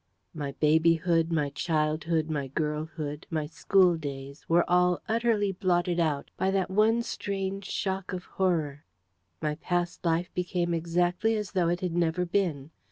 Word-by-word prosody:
My 145 -4 -4
babyhood, 165 +2 +3
my 150 -3 0
childhood, 155 +1 0
my 145 -4 -2
girlhood, 150 +1 -3
my 155 -2 -1
school 175 +3 +3
days 140 -2 -7
were 170 +1 +4
all 180 0 +3
utterly 225 -3 +1
blotted 175 -2 0
out 155 -4 0
by 190 - +1
that 190 -1 0
one 220 +4 +3
strange 195 -3 -3
shock 190 0 -3
of 180 -1 -4
horror. 160 -6 -1 0.6
My 150 - +1
past 175 +3 -2
life 170 +1 0
became 175 -1 -1
exactly 175 +6 +1
as 210 -2 -3
though 180 -4 +1
it 175 +1 -1
had 180 -2 -2
never 175 +1 +1
been. 170 -6 -1
170 Hz, 150 wpm, -28 LUFS, 155-185 Hz, 0.6 s, were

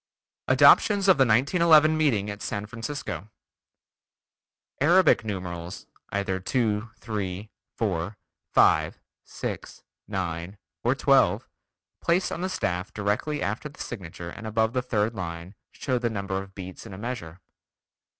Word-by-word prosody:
ADOPTIONS 200 -2 +6
OF 185 -7 +6
THE 135 - +6
1911 155 - +5
MEETING 115 -10 +1
AT 105 0 -8
SAN 100 0 -3
FRANCISCO 110 - -5 1.5
Arabic 175 -2 +5
numerals, 90 -4 -5 0.2
either 100 -2 -1
2, 105 +2 0
3, 105 -2 -4 0.3
4, 100 -2 -2 0.3
5, - - +4 0.2
6, - - -6 0.2
9, 90 -1 -4 0.3
or - - +2
12, - - +3 0.5
placed 175 +3 +1
on 170 - -4
the 185 - -1
staff 90 - -2
directly 105 +9 -1
after 110 +9 -3
the 145 - -18
signature 85 -5 -7
and 110 - -8
above 110 +1 +1
the 125 - +1
third 115 -3 0
line, 85 -1 -6 0.2
show 130 -2 -1
the 120 -1 0
number 100 -3 -3
of 95 0 -13
beats 95 +3 -8
in 100 - -8
a - - -9
measure. 100 -7 -6
105 Hz, 130 wpm, -26 LUFS, 95-125 Hz, 1.5 s, ADOPTIONS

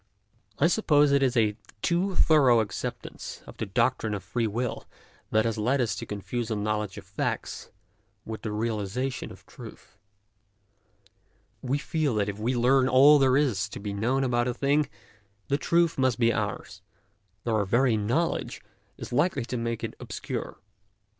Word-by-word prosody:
I 140 - +3
suppose 150 -6 +4
it 140 0 +4
is 130 -2 +2
a 105 -2 +3 0.3
too 180 +2 +1
thorough 135 -9 +5
acceptance 110 -2 -5
of - - -12
the - - -3
doctrine 110 -2 0
of 100 - -6
free 115 -2 -1
will 120 +3 -3 0.4
that 110 +1 +2
has 115 -1 -1
led 125 +6 +1
us 115 -6 0
to - - -6
confuse 110 +3 -4
a 110 - -1
knowledge 105 -1 -2
of 100 - -9
facts 95 +1 -4 0.6
with 110 0 -6
the 110 - -4
realization 110 +4 -2
of - - -14
truth. 100 - -13 1.6
We 130 +2 0
feel 150 -3 -1
that 105 -1 0
if 100 +1 -6
we 120 +4 0
learn 130 +2 +3
all 140 +3 +7
that 135 - +4
there 130 0 +4
is 120 -10 +1
to - - -8
be 100 0 -4
known 120 +7 0
about 120 -1 +1
a 125 - -2
thing, 145 +2 +1 0.6
the 140 +1 +1
truth 170 -1 +2
must 130 -4 +2
be 115 -1 +3
ours, 100 -2 -4 0.6
though 115 - -1
our 105 -2 +2
very 120 +4 +3
knowledge 120 +11 -1 0.4
is - - -8
likely 140 -2 +1
to 120 - -4
make 115 -1 -3
it - - -3
obscure. - - -5
120 Hz, 170 wpm, -27 LUFS, 105-135 Hz, 1.6 s, all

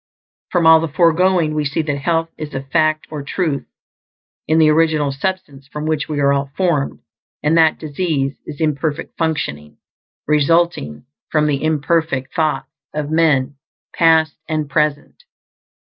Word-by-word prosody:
From 175 -2 +1
all 160 0 +8
the 165 - -2
foregoing, 170 +1 +2
we 155 0 0
see 145 +3 -1
that 145 -2 -2
health 165 +2 0
is 150 -2 -7
a 135 - -3
fact 155 +2 +1
or 150 -2 -5
TRUTH 150 0 -2 0.8
in 155 +2 +2
the 155 -1 +5
original 155 -2 +2
substance 140 -3 -4
from 150 +1 -6
which 155 -1 -1
we 150 -2 -2
are 140 0 +3
all 140 0 -1
formed; 170 -7 0 0.4
and 150 +2 +2
that 160 -1 +4
disease 145 -3 -2
is 145 - -8
imperfect 150 -1 -2
functioning, 75 - -3 0.5
resulting 150 - +1 0.2
from 150 -1 +2
the 145 -1 0
imperfect 155 -3 0
thoughts 155 -5 -1 0.2
of 150 0 -3
men, 145 -4 +2 0.4
past 160 -2 +3
and 155 -2 -1
present. 150 - -1
155 Hz, 145 wpm, -18 LUFS, 140-160 Hz, 0.8 s, all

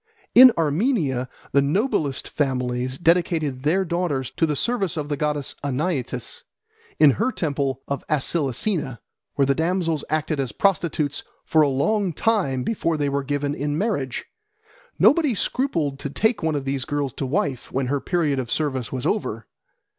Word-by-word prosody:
In 255 +1 +10
Armenia 155 - +1 0.2
the 140 - +4
noblest 155 - 0
families 130 -2 -1
dedicated 165 -6 +1
their 175 +7 +2
daughters 160 -7 -1
to 165 - +1
the 150 - -1
service 195 -4 -1
of 150 -1 -3
the 145 - 0
goddess 150 -2 -1
Anaitis 135 -3 -2 0.6
in 150 -2 +7
her 260 - +2
temple 140 - -2
of 140 -1 -3
Acilisena, 145 - 0 0.4
where 140 - +3
the 140 - +3
damsels 165 -1 0
acted 155 -1 -1
as 130 -5 -2
prostitutes 165 -6 0 0.2
for 160 - +3
a 150 - +4
long 185 +7 +1
time 175 - +1
before 165 - -1
they 145 -1 0
were 140 0 -1
given 145 +1 -1
in 145 0 -2
marriage. 150 - -2 0.7
Nobody 295 -5 +4
scrupled 165 - -1
to 145 - -4
take 220 - +1
one 160 -2 0
of 140 -2 -3
these 135 -1 -1
girls 145 -4 -2
to 135 - -3
wife 140 - -2
when 135 0 -1
her 140 +2 -1
period 155 -6 0
of 125 -3 -4
service 135 -6 -1
was 130 -1 -4
over. 115 - -1
145 Hz, 160 wpm, -23 LUFS, 135-175 Hz, 0.7 s, In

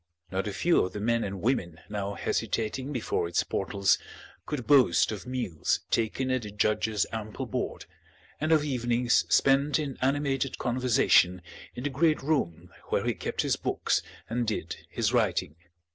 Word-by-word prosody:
Not 95 +2 -1
a - - -2
few 170 - +3
of 90 - -4
the 105 - -4
men 115 +2 +1
and 100 -1 -5
women 90 -10 0
now 100 -1 -3
hesitating 120 +9 -2
before 115 -9 -1
its 85 - +1
portals 100 -1 +1 0.5
could 145 -6 -3
boast 140 -6 +5
of 105 +3 -6
meals 120 -11 -1
taken 130 +3 0
at 130 -1 +1
the 105 - -7
judge's 105 0 +1
ample 110 -1 -5
board, - - -4 0.5
and 155 +2 0
of 155 -2 +5
evenings 120 -3 +1
spent 140 +1 +4
in 145 -4 -4
animated 135 0 0
conversation 120 -8 +3 0.3
in 125 - -6
the 145 - -1
great 155 +2 +2
room 90 - -1 0.2
where - - 0
he - - +1
kept - - -3
his - - +1
books - - 0 0.3
and 120 0 -1
did 95 -6 -3
his - - 0
writing. 75 - +1
120 Hz, 160 wpm, -28 LUFS, 100-135 Hz, 0.5 s, boast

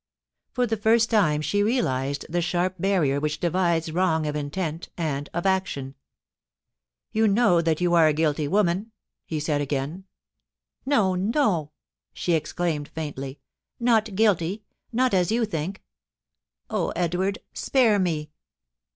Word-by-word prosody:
For 250 - +1
the 225 -1 -1
first 225 +2 +3
time 155 -9 +3
she 205 +6 +1
realised 140 - 0
the 175 +2 -1
sharp 180 +2 -1
barrier 170 -8 +2
which 150 +1 -2
divides 170 -2 +1
wrong 160 -2 +1
of 150 0 -2
intent 155 +3 -3
and 145 -4 -2
of 175 +2 -3
action. 185 -9 -1 0.6
* - - -64
You 220 0 +3
know 200 -5 +4
that 165 0 0
you 175 -1 +2
are 165 -2 +6
a 155 - +3
guilty 150 -1 0
woman,' 200 +4 +1 0.3
he 155 - -2
said 150 -1 0
again. 145 +6 -3 0.4
* - - -52
No, 215 -10 +3
no 190 - +1 0.2
!' - - -61
she 175 - -1
exclaimed 155 -1 -1
faintly; 140 -3 -6 0.4
not 225 -4 +2
guilty 205 -1 +1
— - - -56
not 250 0 +1
as 185 +1 +2
you 230 0 +2
think. 190 -1 -4 0.8
Oh, 210 -5 -1
Edward! 180 +3 0 0.2
spare 235 -6 +3
me.' 155 -5 -1
175 Hz, 150 wpm, -25 LUFS, 150-205 Hz, 0.8 s, are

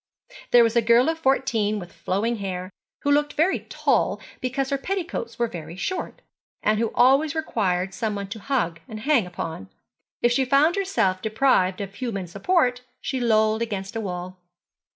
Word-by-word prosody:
There 240 -1 +7
was 230 0 +1
a 235 - +5
girl 235 +5 +4
of 325 0 -2
fourteen 230 -7 +1
with 175 -3 -8
flowing 220 +5 -1
hair, 185 -2 -4 0.3
who 285 - +2
looked 295 0 +2
very 335 +5 +2
tall - - +1 0.2
because 265 +2 -2
her 275 - +2
petticoats 335 -10 -4
were 240 - +2
very 170 -4 -8
short, 370 - -4 0.4
and 215 0 +2
who 230 -1 0
always 275 +5 +4
required 190 - -1
some 215 0 -2
one 200 -1 -4
to 220 +2 -6
hug 200 -10 -1
and 215 -3 -7
hang 250 -6 +2
upon. 160 - -6 0.5
If 240 - +4
she 265 +3 +3
found 280 +6 +4
herself 375 - 0
deprived 215 -5 +2
of 195 -1 -6
human 205 -5 -4
support 250 - +1 0.2
she 265 - -3
lolled 220 -2 +2
against 200 -3 -4
a 225 - -1
wall. 180 -2 -5
230 Hz, 175 wpm, -24 LUFS, 195-270 Hz, 0.5 s, There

